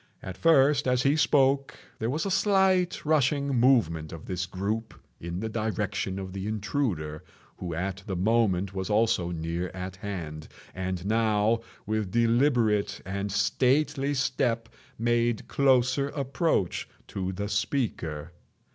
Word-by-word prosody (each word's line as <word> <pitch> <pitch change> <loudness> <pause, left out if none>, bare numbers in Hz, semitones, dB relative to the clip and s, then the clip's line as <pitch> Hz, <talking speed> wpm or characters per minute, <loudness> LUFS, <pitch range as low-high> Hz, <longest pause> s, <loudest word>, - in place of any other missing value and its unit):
At 95 - -6
first, 145 - +4
as 125 0 +2
he 140 +2 +3
spoke, 140 -2 +2 0.2
there 110 - -1
was 150 +8 -1
a 195 - -1
slight 190 -3 +2
rushing 140 -2 +2
movement 115 - +2
of 80 -2 -9
this 90 0 -3
group 100 +5 -3 0.2
in 85 +2 -5
the 110 - -2
direction 105 -3 -2
of 95 -1 -6
the 95 +1 -4
intruder, 105 - -2 0.3
who 85 -3 -5
at 95 +3 -3
the 95 - -2
moment 100 -1 +1
was 95 0 -3
also 105 -5 +2
near 85 +1 -3
at 95 0 -6
hand, 85 -7 -6 0.3
and 95 -1 -4
now, 110 +1 +2 0.3
with 110 -2 -1
deliberate 115 -2 +2
and 100 +1 -3
stately 135 +8 +1
step, 125 -4 0 0.3
made 120 0 +1
closer 135 0 +2
approach 140 - -1 0.2
to 95 -1 -3
the 100 +2 -4
speaker. 100 - -2
110 Hz, 135 wpm, -27 LUFS, 95-130 Hz, 0.3 s, first